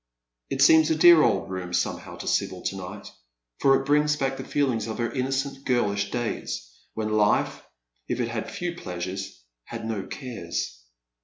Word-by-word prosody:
It 135 Hz, -, +2 dB
seems 160 Hz, +2 st, +7 dB
a 160 Hz, -, +3 dB
dear 170 Hz, 0 st, +8 dB
old 95 Hz, -, +1 dB
room 90 Hz, -1 st, -5 dB
somehow -, -, -2 dB
to -, -, -8 dB
Sibyl -, -, 0 dB
to -, -, -2 dB
night, 95 Hz, +2 st, -8 dB, 0.5 s
for 135 Hz, 0 st, +5 dB
it 135 Hz, -, -6 dB
brings 150 Hz, +1 st, +3 dB
back 135 Hz, -2 st, -1 dB
the 130 Hz, -, -6 dB
feelings 130 Hz, -6 st, 0 dB
of 110 Hz, -, -4 dB
her 120 Hz, -1 st, -1 dB
innocent 135 Hz, +1 st, -2 dB
girlish 100 Hz, -6 st, +1 dB
days, 100 Hz, -, -4 dB, 0.2 s
when 110 Hz, -1 st, -2 dB
life, 105 Hz, -1 st, +2 dB, 0.5 s
if -, -, -2 dB
it 120 Hz, -1 st, 0 dB
had 115 Hz, -1 st, -4 dB
few 175 Hz, -1 st, -4 dB
pleasures, 95 Hz, -, -6 dB, 0.2 s
had -, -, -6 dB
no 110 Hz, -4 st, -3 dB
cares. 85 Hz, -, -5 dB
120 Hz, 170 wpm, -26 LUFS, 100-135 Hz, 0.5 s, dear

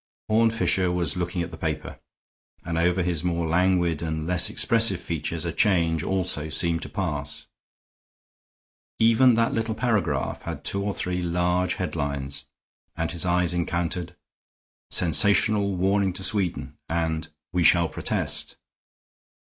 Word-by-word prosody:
Horne 115 Hz, +1 st, +4 dB
Fisher 95 Hz, -5 st, +1 dB
was 90 Hz, -2 st, -1 dB
looking 90 Hz, 0 st, -2 dB
at 85 Hz, -, -7 dB
the 80 Hz, -, -10 dB
paper, 80 Hz, -2 st, -4 dB, 0.7 s
and 85 Hz, 0 st, -3 dB
over 90 Hz, +2 st, +2 dB
his 85 Hz, -3 st, -2 dB
more 85 Hz, -1 st, -1 dB
languid 85 Hz, -1 st, +1 dB
and 80 Hz, -1 st, -3 dB
less 90 Hz, +1 st, +2 dB
expressive 115 Hz, -5 st, +3 dB
features 85 Hz, -1 st, -4 dB
a 85 Hz, -, -1 dB
change 85 Hz, -7 st, +2 dB
also 90 Hz, -4 st, -1 dB
seemed 85 Hz, +1 st, 0 dB
to -, -, -7 dB
pass. 75 Hz, -7 st, -4 dB, 1.5 s
Even 115 Hz, +2 st, +5 dB
that 115 Hz, 0 st, +1 dB
little 110 Hz, -1 st, -1 dB
paragraph 110 Hz, -6 st, -1 dB
had -, -, -6 dB
two 100 Hz, -, 0 dB
or 100 Hz, 0 st, -2 dB
three 90 Hz, 0 st, -2 dB
large 90 Hz, +1 st, 0 dB
headlines, 70 Hz, -1 st, -4 dB, 0.5 s
and 80 Hz, -1 st, -1 dB
his 85 Hz, +1 st, -1 dB
eye 90 Hz, 0 st, +2 dB
encountered, 85 Hz, 0 st, -2 dB, 0.7 s
"Sensational 100 Hz, +3 st, +3 dB
Warning 95 Hz, +1 st, +1 dB
to 95 Hz, -, -7 dB
Sweden," 95 Hz, -4 st, -1 dB
and, 80 Hz, -1 st, -1 dB, 0.3 s
"We 90 Hz, -, +1 dB
Shall 85 Hz, 0 st, +5 dB
Protest." 70 Hz, -, -2 dB
90 Hz, 135 wpm, -25 LUFS, 85-95 Hz, 1.5 s, Even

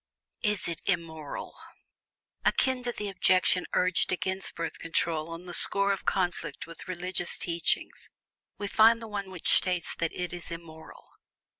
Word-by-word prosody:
IS 210 Hz, -3 st, 0 dB
IT 170 Hz, -2 st, -4 dB
IMMORAL? 160 Hz, -5 st, -3 dB, 0.9 s
Akin 260 Hz, -1 st, +1 dB
to 245 Hz, 0 st, -2 dB
the 210 Hz, -3 st, -5 dB
objection 185 Hz, -1 st, +2 dB
urged 185 Hz, 0 st, +2 dB
against 190 Hz, +1 st, -3 dB
Birth 165 Hz, -1 st, -5 dB
Control 165 Hz, -1 st, -1 dB
on 165 Hz, +2 st, -8 dB
the 175 Hz, -, -8 dB
score 200 Hz, +3 st, +7 dB
of 195 Hz, -, -7 dB
conflict 175 Hz, -5 st, -1 dB
with 165 Hz, -1 st, -11 dB
religious 180 Hz, -1 st, 0 dB
teachings, 170 Hz, -1 st, -1 dB, 0.5 s
we 205 Hz, -, -4 dB
find 225 Hz, +2 st, +5 dB
the 225 Hz, -, -8 dB
one 200 Hz, -2 st, -5 dB
which 185 Hz, -3 st, +1 dB
states 180 Hz, -2 st, +2 dB
that 165 Hz, -1 st, -2 dB
"it 180 Hz, 0 st, -4 dB
is 175 Hz, -1 st, -7 dB
IMMORAL." 165 Hz, -1 st, -10 dB
180 Hz, 150 wpm, -28 LUFS, 165-200 Hz, 0.9 s, score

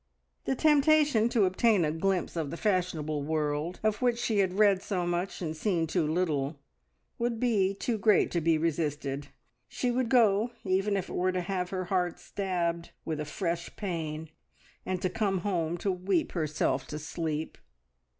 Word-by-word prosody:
The 265 Hz, -, 0 dB
temptation 295 Hz, -5 st, +4 dB
to 225 Hz, -4 st, +3 dB
obtain 190 Hz, 0 st, +3 dB
a 150 Hz, -, 0 dB
glimpse 180 Hz, +3 st, -1 dB
of 160 Hz, -4 st, -2 dB
the 170 Hz, -, -5 dB
fashionable 170 Hz, -7 st, 0 dB
world 150 Hz, +3 st, -1 dB
of 215 Hz, +1 st, +1 dB
which 245 Hz, -2 st, +2 dB
she 230 Hz, -3 st, 0 dB
had 190 Hz, -2 st, +2 dB
read 200 Hz, -3 st, +5 dB
so 190 Hz, -3 st, -2 dB
much 175 Hz, +2 st, -2 dB
and 160 Hz, -1 st, -3 dB
seen 170 Hz, -1 st, 0 dB
too 160 Hz, -1 st, 0 dB
little 155 Hz, -3 st, 0 dB, 0.6 s
would 235 Hz, -1 st, -1 dB
be 200 Hz, -6 st, +2 dB
too 225 Hz, +2 st, -2 dB
great 210 Hz, 0 st, +4 dB
to 170 Hz, -, 0 dB
be 160 Hz, 0 st, +3 dB
resisted; 145 Hz, -3 st, -2 dB, 0.4 s
she 245 Hz, -, -1 dB
would 245 Hz, -1 st, 0 dB
go 230 Hz, -1 st, +4 dB
even 195 Hz, +1 st, +1 dB
if 190 Hz, -, -3 dB
it -, -, -8 dB
were 185 Hz, +1 st, +1 dB
to 185 Hz, 0 st, -1 dB
have 180 Hz, 0 st, -2 dB
her 185 Hz, -1 st, -3 dB
heart 180 Hz, -2 st, 0 dB
stabbed 170 Hz, -3 st, -2 dB, 0.2 s
with 155 Hz, -2 st, -2 dB
a 150 Hz, -, -2 dB
fresh 170 Hz, +2 st, -3 dB
pain, 160 Hz, -5 st, -4 dB, 0.6 s
and 185 Hz, -1 st, -2 dB
to -, -, +3 dB
come 195 Hz, -3 st, 0 dB
home 175 Hz, -4 st, -1 dB
to 195 Hz, +3 st, 0 dB
weep 185 Hz, -1 st, 0 dB
herself 150 Hz, -5 st, -1 dB
to 150 Hz, -, -5 dB
sleep! 155 Hz, 0 st, -4 dB
180 Hz, 175 wpm, -29 LUFS, 160-205 Hz, 0.6 s, read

